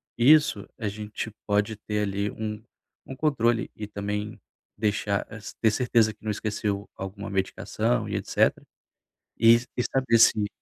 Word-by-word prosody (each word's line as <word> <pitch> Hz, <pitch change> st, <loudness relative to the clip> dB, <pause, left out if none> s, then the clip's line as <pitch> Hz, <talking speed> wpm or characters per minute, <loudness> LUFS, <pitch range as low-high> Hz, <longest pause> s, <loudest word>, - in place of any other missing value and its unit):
isso 130 Hz, -4 st, +4 dB
a 110 Hz, -, -3 dB
gente 105 Hz, +1 st, -5 dB, 0.2 s
pode 105 Hz, +1 st, +1 dB
ter 105 Hz, 0 st, -2 dB
ali 100 Hz, +1 st, -1 dB
um 105 Hz, 0 st, -5 dB, 0.4 s
um 135 Hz, -, -8 dB
controle 120 Hz, -6 st, +1 dB
e 105 Hz, -1 st, -6 dB
também 105 Hz, +1 st, -4 dB, 0.4 s
deixar 105 Hz, -1 st, 0 dB
es 105 Hz, 0 st, -9 dB
ter 110 Hz, -2 st, +4 dB
certeza 115 Hz, -2 st, +2 dB
que 105 Hz, -, -30 dB
não 110 Hz, -, -3 dB
esqueceu 105 Hz, -1 st, -2 dB
alguma 100 Hz, +1 st, -6 dB
medicação 95 Hz, -9 st, -1 dB
e -, -, -5 dB
etc. -, -, +2 dB, 0.9 s
E 115 Hz, +1 st, +9 dB, 0.2 s
e 125 Hz, -, 0 dB
saber 125 Hz, -3 st, +2 dB
se 105 Hz, -2 st, +5 dB
105 Hz, 145 wpm, -26 LUFS, 100-115 Hz, 0.9 s, E